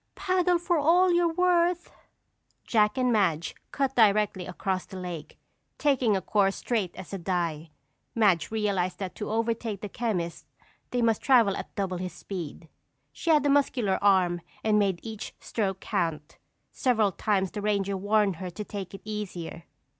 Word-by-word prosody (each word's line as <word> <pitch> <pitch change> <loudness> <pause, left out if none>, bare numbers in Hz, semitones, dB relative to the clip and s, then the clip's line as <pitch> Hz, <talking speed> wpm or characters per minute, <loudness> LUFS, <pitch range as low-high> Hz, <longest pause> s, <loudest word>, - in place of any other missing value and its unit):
"Paddle 365 -2 +2
for 345 -1 0
all 350 +5 +4
you're 345 -1 +3
worth!" 350 0 +2 0.7
Jack 210 -1 +2
and 250 -2 +2
Madge 170 -7 +1 0.2
cut 270 -1 -1
directly 210 -4 +3
across 190 -1 -3
the 190 - -9
lake, 180 -4 -7 0.4
taking 255 -8 +2
a 190 - -5
course 195 -1 +2
straight 210 -8 -2
as 190 +1 -9
a 195 - -3
die. 170 -3 -2 0.5
Madge 195 -8 +3
realized 195 -5 -1
that 190 -2 -5
to 210 - -5
overtake 225 -2 -1
the 210 - -4
chemist 185 -9 -3 0.4
they 245 -1 0
must 225 -2 +2
travel 235 -7 +4
at - - -7
double 190 -2 -2
his 180 0 -5
speed. 170 -4 -7 0.4
She - - -5
had 300 -3 +5
a - - +3
muscular 250 -8 +2
arm 185 -3 +3 0.2
and 215 -1 +3
made 195 -4 +1
each 220 -2 -7
stroke 195 -4 -2
count. 155 -3 -2 0.3
Several 225 -6 +2
times 195 -1 0
the 210 - -5
ranger 200 -1 0
warned 205 -1 +1
her 185 +1 -5
to 195 +5 -6
take 200 -2 -7
it - - -11
easier. 185 -6 -6
205 Hz, 160 wpm, -27 LUFS, 185-235 Hz, 0.7 s, had